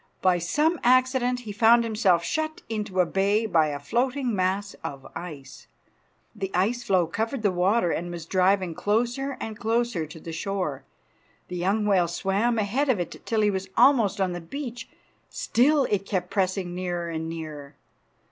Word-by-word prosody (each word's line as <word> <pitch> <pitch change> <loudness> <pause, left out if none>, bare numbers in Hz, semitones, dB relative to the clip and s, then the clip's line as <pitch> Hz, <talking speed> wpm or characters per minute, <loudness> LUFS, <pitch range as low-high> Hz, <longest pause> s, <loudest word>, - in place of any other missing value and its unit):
By 180 -1 +4
some 300 - +1
accident 255 0 +3
he 220 -4 -7
found 230 +3 +5
himself 210 -6 +2
shut 315 - -2
into 210 -4 -1
a - - +2
bay 200 +5 +1
by 165 -7 +3
a 145 -1 -3
floating 245 - -1
mass 195 +2 -1
of 140 -1 -6
ice. 145 -6 -9 0.7
The 195 -3 -3
ice 215 +7 +1
floe 190 -7 +2
covered 225 +8 -3
the 205 - +3
water 180 +1 +2
and 175 +1 -3
was 170 -2 -6
driving 185 0 +2
closer 240 - -1
and 220 -1 -6
closer 225 -7 0
to 160 +2 -11
the 165 +1 -8
shore. 180 -5 -3 0.6
The 180 - -5
young 200 +5 +1
whale 190 -4 +3
swam 200 +7 0
ahead 235 +7 0
of 235 -7 +2
it 175 - -5
till 225 -1 +1
he 210 -1 +3
was 190 0 -4
almost 235 -6 +4
on 190 -2 +1
the 175 0 -5
beach. 240 - -7 0.4
Still 285 +4 +2
it 200 -2 0
kept 180 -3 -2
pressing 185 -2 -1
nearer 175 -1 -3
and 160 0 -4
nearer. 155 -3 -7
200 Hz, 170 wpm, -26 LUFS, 175-235 Hz, 0.7 s, found